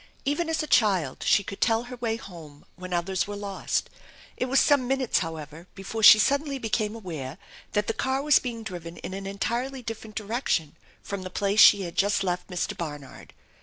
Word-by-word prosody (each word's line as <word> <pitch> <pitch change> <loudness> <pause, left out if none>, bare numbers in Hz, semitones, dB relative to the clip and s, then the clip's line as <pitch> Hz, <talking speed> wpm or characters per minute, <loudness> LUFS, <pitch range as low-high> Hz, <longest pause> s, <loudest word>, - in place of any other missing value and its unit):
Even 295 +4 0
as 320 -1 0
a - - -5
child 195 - +2
she 200 - +4
could 195 - -8
tell 225 0 +2
her 250 +1 -8
way 230 -2 -1
home 165 -9 -12
when 185 0 -9
others 180 +2 -1
were 205 - -5
lost. 200 -1 -2 0.5
It - - -1
was 265 +1 +3
some 280 -4 +3
minutes, 270 -1 +1
however, 160 +1 -7
before 205 +3 -5
she 210 0 +10
suddenly 280 +5 +1
became 220 -2 -1
aware 160 -9 -6 0.4
tha 210 - +2
4. - - -21
the 225 - -1
Car 265 +3 -1
was 295 -1 +5
being 235 -3 -5
driven 175 -4 -7
in - - -7
an 195 0 -5
entirely 240 +6 -3
different 220 -2 -7
direction 210 - -1 0.3
from 200 -1 -5
the 185 - -6
place 200 +3 0
she 200 -2 +8
had 170 -2 -6
just 200 0 +2
left 180 -1 -2
Mr. 180 -2 -3
Barnard. 145 -5 -8
205 Hz, 200 wpm, -26 LUFS, 180-245 Hz, 0.5 s, she